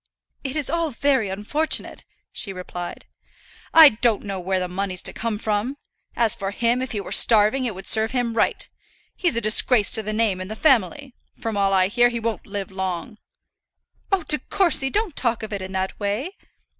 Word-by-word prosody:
"It 270 +1 -4
is 300 -3 0
all 335 +1 -1
very 265 -5 0
unfortunate," 210 +12 -1 0.3
she 200 - -5
replied. 180 -1 -8 0.7
"I 320 -2 +9
don't 225 -2 0
know 195 -2 -5
where 185 +1 -1
the 180 - -3
money's 185 0 -4
to - - -3
come 225 -2 -3
from. 215 +6 -2 0.4
As 230 -3 +1
for 195 - -5
him, 235 +4 0
if 260 - -4
he 210 - -2
were 200 - -8
starving, 225 +4 +5
it 225 -5 -3
would 190 +1 -10
serve 220 0 +4
him 245 -3 -2
right. 225 - 0 0.5
He's 350 -9 0
a 235 - +1
disgrace 215 +1 +4
to 220 - +2
the 215 0 -5
name 215 -4 0
and 185 - -7
the 215 - -5
family. 265 - +1 0.3
From 225 -2 -4
all 200 -1 +1
I 185 -1 +3
hear, 240 +4 +3
he 235 -1 -4
won't 230 -1 -4
live 200 -1 -6
long." 190 +3 -5 0.9
"Oh, 390 -3 +1
De 300 - +2
Courcy, 315 -8 +2
don't 410 -2 -2
talk 235 -3 0
of 220 - -6
it 200 - -4
in 190 0 -7
that 190 0 -3
way!" 220 - -3
220 Hz, 195 wpm, -22 LUFS, 195-260 Hz, 0.9 s, I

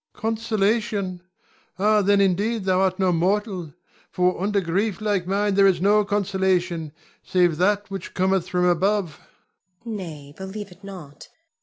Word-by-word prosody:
Consolation! 215 -4 -1 0.6
ah, 210 +2 +3
then 200 +1 +3
indeed 200 +4 +1
thou 185 0 +2
art 185 -1 +1
no 190 -2 +2
mortal; 185 -1 -1 0.4
for 180 0 0
unto 205 +1 +1
grief 190 +2 -1
like 205 -4 -1
mine 200 +1 +1
there 195 0 +5
is 185 -3 +2
no 205 +3 +4
consolation, 190 -5 0 0.3
save 175 -4 +2
that 205 +3 +1
which 195 -3 -7
cometh 190 -1 +1
from 180 -1 +1
above. 180 -1 +1 0.6
Zuleika. 235 - -8
Nay, 155 -7 -8
believe 190 +2 -7
it 180 +3 -17
not. 175 -8 -10
190 Hz, 145 wpm, -23 LUFS, 180-205 Hz, 0.6 s, there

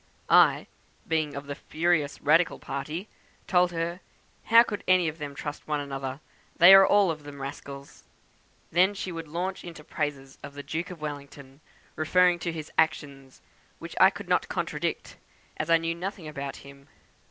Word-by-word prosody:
I, - - +5 0.4
being 155 -3 -1
of 140 0 -6
the 145 - -5
furious 155 0 -1
radical 165 +4 +3
party, 150 +8 -5 0.4
told 180 -1 +3
her 170 +1 -3 0.5
'how 230 +1 +7
could 205 -4 -6
any 185 -2 +4
of 155 +1 -5
them 145 -1 -6
trust 145 +1 -7
one 150 -1 -1
another; 135 -1 -5 0.4
they 180 +2 +10
were 195 0 +8
all 200 -3 +4
of 155 -1 -7
them 145 -1 -10
rascals!' 140 0 -9 0.7
Then 185 +5 +3
she 190 -2 -5
would 165 -1 -7
launch 180 +5 -4
out - - -10
into 165 -3 -10
praises 140 -3 -5
of 140 - -10
the 145 - -7
Duke 165 +5 -4
of 175 -4 -10
Wellington, 140 -1 -8 0.3
referring 180 +2 +3
to 170 0 -3
his 160 -2 -7
actions; 140 -4 -1 0.3
which - - -9
I - - +9
could - - -10
not - - +1
contradict, - - -3 0.4
as 155 - -3
I 165 - +6
knew 165 0 -2
nothing 180 -1 -6
about 140 -2 -6
him. 140 0 -15
155 Hz, 175 wpm, -27 LUFS, 140-175 Hz, 0.7 s, they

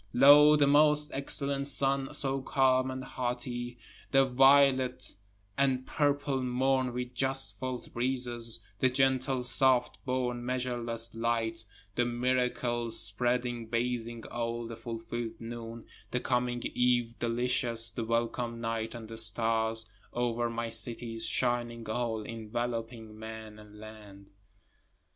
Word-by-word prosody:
Lo, 145 +3 +8
the 145 -1 +4
most 150 +1 +4
excellent 140 0 0
sun 135 0 +3
so 135 -1 -2
calm 130 -1 +2
and 130 0 -5
haughty, 120 -1 -4 0.3
The 135 -1 +4
violet 135 0 +4 0.5
and 130 -2 +1
purple 145 -2 0
morn 130 +1 +1
with 125 0 -5
just 130 -6 -1
felt 130 -1 -5
breezes, 120 -2 +2
The 130 - +3
gentle 130 0 +1
soft 130 0 +2
born 125 -2 -2
measureless 120 -2 -1
light, 115 -1 -2 0.3
The 120 - +1
miracle 120 -1 -1
spreading 120 +2 0
bathing 115 0 -3
all, 115 0 -3
the 115 0 -7
fulfill'd 115 0 -6
noon, 115 0 -8 0.2
The 125 - -1
coming 125 -1 -1
eve 120 -1 +1
delicious, 120 -1 +1
the 115 - -4
welcome 115 +1 -2
night 115 0 -3
and 115 -2 -8
the 115 0 -5
stars, 110 0 0 0.3
Over 120 -1 -1
my 115 0 -3
cities 115 -1 -1
shining 120 -2 -1
all, 110 -1 -2
enveloping 115 0 -5
man 110 -1 -9
and 105 0 -15
land. 105 -2 -13
120 Hz, 120 wpm, -30 LUFS, 115-130 Hz, 0.5 s, Lo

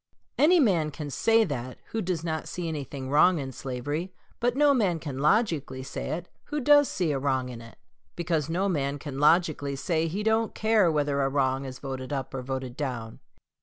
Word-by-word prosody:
Any 345 +4 +6
man 180 - +3
can 150 -1 -6
say 225 +9 +4
that 130 - -4
who 225 - -1
does 175 -4 -2
not 160 -2 -3
see 175 -2 -4
anything 140 -3 -5
wrong 170 +5 +5
in 135 -3 -4
slavery, 145 +8 -4 0.3
but 245 +1 +1
no 290 0 +5
man 200 -10 +2
can 145 -4 -6
logically 150 - +1
say - - -5
it 175 +1 -9 0.2
who 300 0 -3
does 290 +1 +5
see 175 -5 0
a 140 - -1
wrong 130 -2 0
in 120 -2 -8
it; 115 0 -13 0.4
because 165 -3 -1
no 185 +4 0
man 145 -6 -1
can 140 -1 -6
logically 150 -2 +3
say 165 +3 0
he 195 +6 -3
don't 220 +1 +1
care 215 -5 +3
whether 145 -2 +1
a 135 - +2
wrong 135 -1 0
is 130 -1 -7
voted 130 0 -6
up 135 -3 -3
or 135 - -3
voted 130 -1 -4
down. 125 -6 -4
150 Hz, 200 wpm, -27 LUFS, 135-185 Hz, 0.4 s, Any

